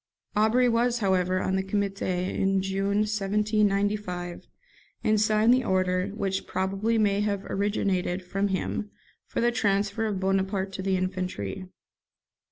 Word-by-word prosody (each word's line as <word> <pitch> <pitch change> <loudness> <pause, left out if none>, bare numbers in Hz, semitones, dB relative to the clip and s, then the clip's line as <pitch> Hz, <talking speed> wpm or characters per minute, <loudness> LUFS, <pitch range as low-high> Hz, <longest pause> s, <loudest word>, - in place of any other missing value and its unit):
Aubry 220 +4 +4
was, 240 +1 +2
however, 185 -3 +1
on 190 - 0
the - - +1
Comité 195 -2 -1
in 195 0 +1
June 195 +2 0
1795, 205 -3 0 0.6
and 215 -1 +3
signed 215 +2 +4
the 255 0 +2
order, 185 -2 +1
which 195 -2 -3
probably 195 +5 0
may 205 -2 +2
have 200 -2 -1
originated 190 -2 -1
from 195 +3 0
him, 195 +2 -2 0.4
for - - -2
the 240 +1 +3
transfer 210 -1 0
of 200 -3 -2
Bonaparte 195 0 0
to 190 - -4
the 190 0 +1
infantry. 185 - -3
195 Hz, 135 wpm, -27 LUFS, 190-210 Hz, 0.6 s, Aubry